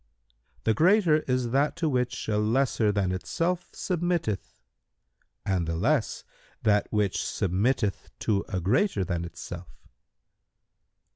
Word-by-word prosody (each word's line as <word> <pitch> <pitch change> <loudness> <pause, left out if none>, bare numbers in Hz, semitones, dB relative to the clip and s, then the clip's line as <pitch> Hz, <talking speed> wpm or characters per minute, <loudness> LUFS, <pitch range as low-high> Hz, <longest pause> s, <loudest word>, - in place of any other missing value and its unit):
"— - - -38
"The 110 - +3
greater 170 - +4
is 125 -2 0
that 140 +3 +2
to 165 -1 -1
which 125 -4 -1
a 105 -1 +1
lesser 110 0 +2
than 100 -3 0
itself 170 - -2
submitteth 175 - -2 0.9
and 95 -4 0
the 80 - -1
less 85 - 0 0.4
that 105 -1 +2
which 105 -3 +1
submitteth 100 +3 0
to 100 -3 +1
a 95 - -1
greater 105 - +2
than 85 -1 -2
itself." 85 - -9
110 Hz, 125 wpm, -27 LUFS, 95-150 Hz, 0.9 s, greater